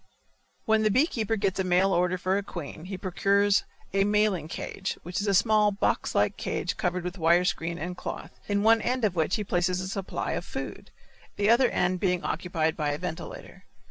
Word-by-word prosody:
When 220 -1 +3
the 215 - +3
bee 255 +8 +4
keeper 225 - -1
gets 195 -3 -1
a - - +2
mail 185 +1 +3
order 180 +1 +2
for 185 +1 0
a 200 - +1
queen 170 -4 -8
he 190 0 -5
procures 200 +2 +2 0.3
a 195 0 +3
mailing 205 -5 +1
cage, 190 +3 -4
which 180 +3 -3
is 205 - -3
a 200 - +3
small 210 +1 +4
box 200 - -1
like - - +2
cage - - -2
covered 180 -1 -1
with 180 +1 -5
wire 170 +2 +4
screen 170 -2 -1
and 175 +1 -4
cloth, 175 - -6 0.2
in 205 0 +1
one 225 0 +5
end 250 +1 0
of 200 - +1
which 165 +2 +1
he 210 - -2
places 180 -1 0
a 185 - -3
supply 195 0 -3
of - - -2
food, - - -7 0.5
the 205 +2 +3
other 245 +1 +5
end 180 +1 0
being 180 -2 0
occupied 160 -3 -1
by 150 -2 -1
a 145 - -1
ventilator. 180 - -7
190 Hz, 205 wpm, -27 LUFS, 180-205 Hz, 0.5 s, one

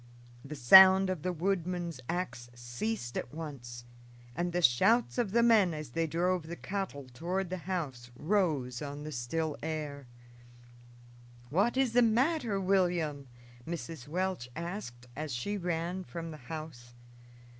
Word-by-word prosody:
The 150 +2 -7
sound 190 +8 +8
of 180 -5 -4
the 180 - -1
woodman's 175 -3 -2
ax 175 -9 -3
ceased 120 - -4
at - - -7
once, 130 -7 -8 0.5
and 175 +3 -1
the 175 0 -1
shouts 225 - +4
of 235 -4 +1
the 235 +2 +4
men, 210 -8 +5
as 150 -5 -7
they 165 +4 0
drove 175 +1 0
the 170 - -5
cattle 190 -8 -4
toward 180 +7 -2
the 185 - -3
house, 135 -10 -3
rose 150 -8 0
on 145 0 -6
the 155 - -6
still 150 +5 -2
air. 150 -3 -4 1.4
"What 205 - +2
is 265 -4 +2
the 245 - +5
matter, 235 -1 +2
William?" 175 -7 +1 0.4
Mrs. 165 -5 -6
Welch 180 -5 -2
asked 170 - -6
as 150 -3 -4
she 165 +13 -2
ran 175 0 -2
from 165 -2 -7
the 155 - -8
house. 150 -7 -8
165 Hz, 145 wpm, -31 LUFS, 140-190 Hz, 1.4 s, sound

